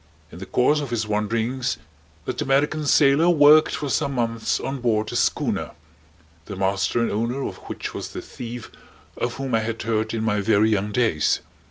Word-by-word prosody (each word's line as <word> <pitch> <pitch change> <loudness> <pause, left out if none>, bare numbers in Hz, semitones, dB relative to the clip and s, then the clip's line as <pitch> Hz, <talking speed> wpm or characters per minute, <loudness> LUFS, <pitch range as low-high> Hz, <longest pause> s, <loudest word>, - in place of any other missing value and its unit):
In 85 - -11
the 95 - -8
course 145 +5 +2
of 140 - -5
his 115 -2 -2
wanderings 115 +4 -1 0.5
that - - -3
American 145 +3 +1
sailor 145 +4 +5
worked 155 -1 +6
for 145 - -4
some 140 0 0
months 115 -2 -1
on 135 -1 -4
board 110 -3 0
a - - -5
schooner, - - 0 0.7
the 100 - -7
master 95 +4 0
and 115 - 0
owner 120 +6 -2
of - - -8
which - - -5
was - - -5
the - - -7
thief 120 -1 -8 0.4
of 120 0 -3
whom 135 -1 -4
I 115 - +4
had 110 0 -4
heard 110 0 -1
in 110 - -2
my 105 -2 +1
very 110 +1 +3
young 105 0 0
days. 110 -10 +1
115 Hz, 185 wpm, -23 LUFS, 110-135 Hz, 0.7 s, worked